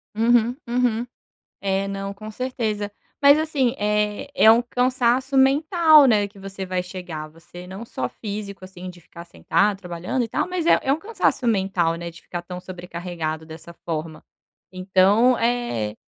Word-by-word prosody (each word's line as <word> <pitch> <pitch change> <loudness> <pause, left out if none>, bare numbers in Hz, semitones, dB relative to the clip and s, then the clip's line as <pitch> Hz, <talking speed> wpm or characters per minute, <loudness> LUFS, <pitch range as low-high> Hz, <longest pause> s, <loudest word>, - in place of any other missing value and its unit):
Uhum, 235 +1 +3
uhum. 240 -1 0 0.5
É, 195 0 -1
não, 195 0 -4
com 215 +2 -9
certeza. 215 -4 -3 0.3
Mas 285 +1 +7
assim, 280 -6 0
eh, 210 +2 0
é 220 - +7
um 230 +2 +5
cansaço 255 +2 +1
mental, 310 +3 +5
né? 210 -4 +3
Que 200 0 -18
você 195 0 -7
vai 185 -1 -2
chegar, 180 -4 -7
você 170 +3 -13
não 190 +5 -8
só 130 - -4
físico 200 - -7
assim 185 -1 -9
de 175 -1 -15
ficar 170 +1 -12
sentado, 195 +3 0
trabalhando 180 +7 -3
e - - -6
tal, - - -1
mas 360 -2 -2
é - - +6
é 270 - +1
um 295 - 0
cansaço 390 - -1
mental, 190 -6 +1
né? 170 0 -6
De 165 - -15
ficar 175 -1 -6
tão 180 +1 -8
sobrecarregado 175 -3 -5
dessa 160 +2 -11
forma. 160 -1 -4 0.5
Então, 190 +6 +3
eh, 230 - -1
200 Hz, 165 wpm, -23 LUFS, 180-245 Hz, 0.5 s, Mas